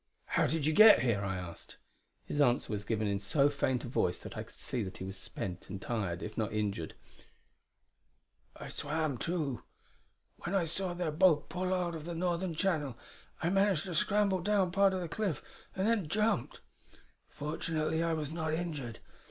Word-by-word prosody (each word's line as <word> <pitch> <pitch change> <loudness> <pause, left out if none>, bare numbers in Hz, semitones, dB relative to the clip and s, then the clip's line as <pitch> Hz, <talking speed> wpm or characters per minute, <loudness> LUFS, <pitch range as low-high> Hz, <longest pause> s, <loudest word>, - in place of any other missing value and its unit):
"How - - +2
did 160 -2 0
you 155 - +3
get 215 - +9
here?" 115 -5 +2
I 95 -1 -1
asked. 90 -2 -8 0.5
His 145 - -1
answer 120 -4 +3
was 105 0 -3
given 110 -1 0
in 100 -1 0
so 140 +9 +3
faint 130 -3 0
a - - -5
voice 90 -7 0
that - - -8
I - - -3
could - - -12
see 125 - -3
that 95 -3 -5
he - - -6
was 95 +1 -5
spent 95 -1 -6
and 100 - -5
tired, 95 -5 -2
if 110 0 -6
not 110 -2 -1
injured: 100 -6 -2 1.6
"I - - -8
swam, 150 -3 -2
too. 155 -8 -2 0.8
When 175 +3 -3
I 185 -3 +3
saw 175 +2 -2
their 175 -3 -1
boat 155 -2 +4
pull 185 +1 -2
out 180 -2 0
of 155 -2 -6
the 170 0 -4
northern 175 0 -1
channel, 155 - 0 0.5
I 170 - +2
managed 195 -4 +3
to 185 - -5
scramble 200 +2 +2
down 195 -1 +2
part 195 +1 +4
of 185 - -2
the 175 - -3
cliff, 195 -1 -2 0.3
and 190 +2 +1
then 220 -7 +2
jumped. 210 - 0 0.7
Fortunately 155 +1 -2
I 165 0 +1
was 155 -2 -2
not 160 -1 -1
injured. 150 -9 -4
155 Hz, 185 wpm, -32 LUFS, 120-180 Hz, 1.6 s, get